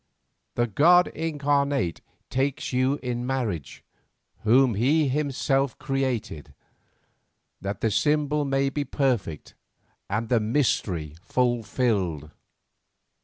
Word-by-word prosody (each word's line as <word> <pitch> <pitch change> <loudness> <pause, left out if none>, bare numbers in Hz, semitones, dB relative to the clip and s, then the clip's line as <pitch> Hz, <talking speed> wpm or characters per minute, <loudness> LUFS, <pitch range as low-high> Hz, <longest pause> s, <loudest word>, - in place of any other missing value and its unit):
The 120 - +2
god 170 - +5
incarnate 145 - 0 0.3
takes 135 0 -1
you 130 +2 +2
in 120 -1 -2
marriage 115 - -3 0.6
whom 125 +3 +4
he 140 +9 +2
himself 135 -2 0
created, 130 - -3 1.1
that 100 +1 -4
the 110 - +1
symbol 150 +4 +1
may 135 0 0
be 145 +1 -2
perfect 125 - -2 0.6
and 110 +3 -1
the 120 0 +3
mystery 105 - 0
fulfilled. 110 - 0
130 Hz, 95 wpm, -25 LUFS, 110-140 Hz, 1.1 s, god